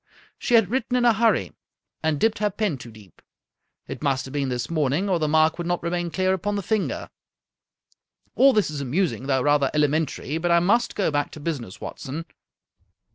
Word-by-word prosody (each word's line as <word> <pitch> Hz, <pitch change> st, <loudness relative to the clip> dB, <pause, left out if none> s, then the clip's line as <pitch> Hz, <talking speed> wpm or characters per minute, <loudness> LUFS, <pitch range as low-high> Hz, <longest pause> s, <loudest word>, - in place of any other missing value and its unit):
She 245 Hz, -, +2 dB
had 225 Hz, -4 st, +4 dB
written 255 Hz, 0 st, -1 dB
in 245 Hz, -, +2 dB
a 235 Hz, -, +6 dB
hurry, 225 Hz, +1 st, +1 dB, 0.5 s
and 155 Hz, -2 st, 0 dB
dipped 225 Hz, +3 st, +1 dB
her 210 Hz, 0 st, +2 dB
pen 200 Hz, -, -2 dB
too 120 Hz, -, -10 dB
deep. 105 Hz, -5 st, -17 dB, 0.7 s
It 135 Hz, -, -7 dB
must 135 Hz, -3 st, 0 dB
have 135 Hz, -, -10 dB
been 140 Hz, -2 st, -1 dB
this 125 Hz, -1 st, -2 dB
morning, 155 Hz, +3 st, 0 dB
or 185 Hz, -3 st, +1 dB
the 155 Hz, -, 0 dB
mark 155 Hz, +2 st, +3 dB
would 170 Hz, -, -3 dB
not 175 Hz, -1 st, -1 dB
remain 175 Hz, 0 st, -1 dB
clear 185 Hz, +3 st, +1 dB
upon 205 Hz, +3 st, -2 dB
the 200 Hz, -, -2 dB
finger. 215 Hz, +2 st, -2 dB, 1.2 s
All 275 Hz, +1 st, +6 dB
this 210 Hz, -9 st, +1 dB
is 145 Hz, -2 st, -4 dB
amusing, 140 Hz, 0 st, -1 dB
though 130 Hz, -2 st, +1 dB
rather 145 Hz, -2 st, +3 dB
elementary, 150 Hz, 0 st, 0 dB
but 175 Hz, +1 st, -1 dB
I 170 Hz, 0 st, +5 dB
must 210 Hz, +8 st, +2 dB
go 195 Hz, -6 st, +1 dB
back 145 Hz, 0 st, 0 dB
to -, -, -9 dB
business, 140 Hz, -, -5 dB
Watson. 155 Hz, +5 st, -6 dB
160 Hz, 195 wpm, -24 LUFS, 140-195 Hz, 1.2 s, a